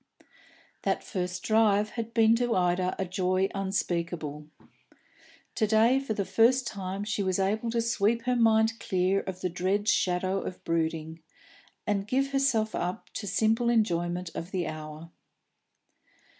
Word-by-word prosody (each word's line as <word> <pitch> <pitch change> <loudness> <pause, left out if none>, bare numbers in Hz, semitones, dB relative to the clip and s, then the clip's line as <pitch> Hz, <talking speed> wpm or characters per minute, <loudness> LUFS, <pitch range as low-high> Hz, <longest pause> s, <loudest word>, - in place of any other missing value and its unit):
That - - -1
first 180 -2 -4
drive 215 -1 +3
had 230 -1 -5
been 225 -1 +4
to 240 -1 0
Ida 180 0 +1
a 190 - -1
joy 185 +1 0
unspeakable. 170 -6 -3 1.1
To 215 - +1
day 225 +5 +4
for 270 -5 -3
the 200 - -1
first 250 +5 +3
time 195 -2 -4
she 205 0 -2
was 185 -2 0
able 210 +4 0
to 230 0 0
sweep 230 0 +1
her 250 0 +1
mind 225 -1 +3
clear 185 +1 +1
of 185 -1 -7
the 180 - -1
dread 190 +4 -1
shadow 185 -1 +1
of 185 - -7
brooding, 160 -1 -2 0.6
and 200 -2 -1
give 270 +4 0
herself 255 -6 +1
up 180 +5 -4
to 205 - -5
simple 225 +4 +2
enjoyment 175 -6 0
of 165 - -6
the 185 -3 -2
hour. 155 +1 -7
195 Hz, 145 wpm, -28 LUFS, 180-225 Hz, 1.1 s, been